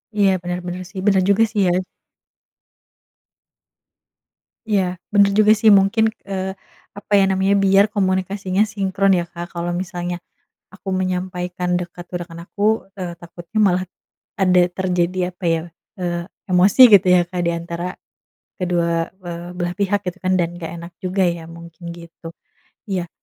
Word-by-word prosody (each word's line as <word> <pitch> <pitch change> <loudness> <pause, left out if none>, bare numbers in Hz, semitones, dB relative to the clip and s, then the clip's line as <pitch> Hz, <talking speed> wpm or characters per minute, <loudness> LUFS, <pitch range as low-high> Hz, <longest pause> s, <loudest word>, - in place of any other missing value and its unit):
Iya 200 -2 +4
bener 180 0 -3
bener 180 +1 -5
sih, 200 -2 -7
bener 195 -2 +4
juga 200 +3 +5
sih 210 -2 0
ya. 175 0 +2 2.9
Iya 185 -4 0
bener 200 -1 +5
juga 215 0 +6
sih 220 0 +5
mungkin, 200 +3 +2 0.2
eee, 190 -1 -3 0.5
apa 205 - -12
ya 195 - +6
namanya 190 +1 +2
biar 195 0 +5
komunikasinya 190 -1 0
sinkron 195 -1 +1
ya, 175 - +1
Kak. 175 0 -8
Kalau 170 0 -2
misalnya 175 -1 -3 0.5
aku 190 +1 -16
menyampaikan 180 -1 -2
dekat 175 0 -5
ke 180 - -8
rekan 170 -1 -9
aku, 210 0 0
eee, 180 -3 -5
takutnya 170 +5 -6
malah 185 -3 +3 0.6
ada 185 -2 +4
terjadi 180 0 -1
apa 185 - -17
ya, 160 - -2 0.4
eee, 175 -1 -2 0.3
emosi 185 +7 +5
gitu 190 -1 +3
ya 180 - +5
Kak 180 -1 -3
diantara 170 +1 -3 0.7
kedua, 170 -2 0 0.2
eee, 175 0 -7
belah 175 0 -2
pihak 200 0 +1
gitu 180 +1 -4
kan 185 - +2
dan 170 0 -2
nggak 165 -2 -6
enak 170 +1 -9
juga 185 +1 0
ya 170 -1 -1
mungkin 170 +1 -10
gitu. 170 -1 -11 0.6
Iya 180 -3 -2
180 Hz, 145 wpm, -20 LUFS, 175-195 Hz, 2.9 s, juga